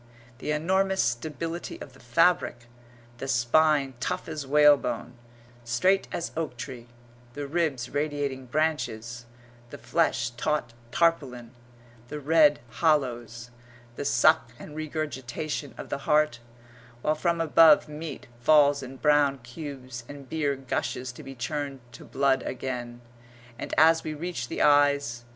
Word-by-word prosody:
The - - -5
enormous 190 +5 +1
stability 155 +8 -3
of 135 - -10
the 135 - -18
fabric; 120 -1 +2 0.5
the 135 - -5
spine 135 +3 +3
tough - - -3
as 155 -4 -5
whalebone, 145 -3 +3 0.5
straight 120 +12 +2
as 170 - -3
oak 155 -6 -3
tree; 120 0 -8 0.5
the 145 0 -4
ribs 140 -5 -1
radiating 145 -2 -3
branches; 120 -6 -2 0.4
the - - -9
flesh 125 -8 0
taut 135 0 -2 0.2
tarpaulin; 135 -8 0 0.6
the 150 +4 -6
red 150 -1 +4 0.2
hollows; 120 -7 0 0.4
the - - -4
suck 120 -3 +3
and 150 - -11
regurgitation 150 -2 -4
of - - -8
the - - -3
heart; 150 -4 +2 0.6
while 155 - +2
from 170 +2 0
above 165 +3 +6
meat 150 -1 -7
falls 145 +2 +5
in 130 0 -9
brown 145 -1 +3
cubes 130 -2 -8
and 140 -2 -10
beer 145 -1 -1
gushes 130 -1 -3
to 120 - -12
be 135 - -9
churned 140 +2 -4
to - - -12
blood 135 -1 +1
again 125 -2 -5 0.6
and - - -6
so 160 +1 +6
we 155 - -4
reach 155 -6 -4
the - - -1
eyes. 145 -5 +3
145 Hz, 135 wpm, -27 LUFS, 125-155 Hz, 0.6 s, above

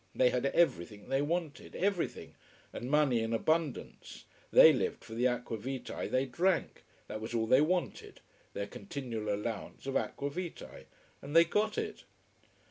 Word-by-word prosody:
They 125 -1 +4
had 125 +2 0
everything 105 - 0
they 135 +1 +2
wanted: 160 0 -3
everything: 195 -2 -2 0.4
and 120 - -5
money 145 -5 +3
in 115 0 -2
abundance. 155 +7 -2 0.2
They - - +8
lived 455 -2 -2
for 110 - -10
the 120 +3 +2
aqua 125 -2 -2
vitae 130 +3 -5
they 130 +1 +1
drank. 170 +8 0 0.2
That 110 - -6
was 110 +2 -5
all 110 -1 +1
they 130 +5 +5
wanted: 175 +3 -1 0.3
their 100 - -3
continual 110 0 -5
allowance 105 +3 -4
of 135 - -3
aqua 140 0 -1
vitae. 175 +2 -7 0.4
And 145 +3 -7
they 165 - +9
got 210 +5 0
it. - - -4
135 Hz, 155 wpm, -32 LUFS, 115-165 Hz, 0.4 s, they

